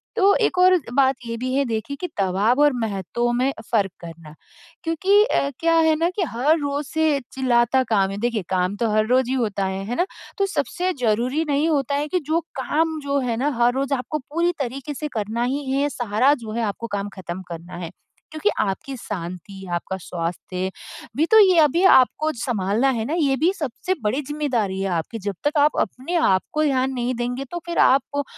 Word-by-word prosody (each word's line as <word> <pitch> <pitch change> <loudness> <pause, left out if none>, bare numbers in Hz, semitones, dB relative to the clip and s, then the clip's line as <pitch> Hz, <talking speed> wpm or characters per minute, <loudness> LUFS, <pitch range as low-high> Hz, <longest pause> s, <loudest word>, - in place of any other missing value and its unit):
तो 400 -2 +5
एक 360 - +1
और 370 0 +6 0.2
बात 270 0 +4
ये 230 0 -4
भी 255 +2 -3
है 280 +1 +2
देखिए 230 +4 -3
कि, 360 - -1
दबाव 200 +8 +2
और 295 -2 +5
महत्व 220 +4 -1
में 255 +3 +1 0.2
फ़र्क 200 -4 +2
करना। 165 -2 -11 0.5
क्योंकि 385 +6 +3
अ, 280 - +1
क्या 330 0 +3
है 320 -1 +4
ना 335 +2 +1
कि 390 - 0
हर 290 +7 +3
रोज़ 285 0 -2
से 315 -3 +1
चिल्लाता 255 0 +2
काम 195 -3 +2
है, 195 - -5
देखिए 235 0 -1
काम 185 +1 0
तो 230 0 0
हर 215 0 +2
रोज़ 255 0 +3
ही 260 - 0
होता 205 -5 -1
है, 190 0 -3
है 240 +3 -3
ना? 355 - +2 0.3
तो 395 - +2
सबसे 370 -1 -1
ज़रूरी 245 +8 +1
नहीं 290 +3 +2
होता 280 -2 0
है 295 +1 -1
कि 360 +3 0
जो 315 +3 +1 0.2
काम, 315 +3 0
जो 280 0 0
है 240 -3 -1
ना 280 +4 +1
हर 245 +1 +4
रोज़ 275 +1 -1
आपको 275 +4 -2
पूरी 335 +6 0
तरीक़े 275 +3 -4
से 300 +2 -4
करना 220 +3 -1
ही 275 +3 -2
है, 275 +1 +1
या 290 - +1
सारा 245 +5 +3
जो 215 - -6
है 235 +1 -1
आपको 230 - -7
काम 200 +1 -4
ख़त्म 180 0 -6
करना 170 +1 -8
है। - - -8 0.4
क्योंकि 315 +7 0
आपकी 265 +8 -2
शाँति, 190 -1 -7
आपका 190 +2 -3
स्वास्थ्य, 180 +1 -4 0.4
अभी 310 - -1
तो 440 - +8
ये 375 -4 +6
अभी 315 +4 +4
आपको 305 +4 +2
सँभालना 225 +1 +1
है 225 - -1
ना? 295 - -3
ये 290 -6 +2
भी 355 - +5
सबसे 295 +6 -2
बड़ी 235 +8 0
ज़िम्मेदारी 260 -10 -2
है 195 - 0
आपकी, 175 +7 -3
जब 200 -1 -4
तक 295 +1 +1
आप 295 +1 +3
अपने 270 +8 -3
आप 190 - +3
को 305 - +1
ध्यान 265 -3 +1
नहीं 245 0 -1
देंगे, 245 +3 -3
तो 345 +6 -6
फ़िर 345 -1 -4
आपको 285 +2 +3
260 Hz, 210 wpm, -22 LUFS, 210-300 Hz, 0.5 s, तो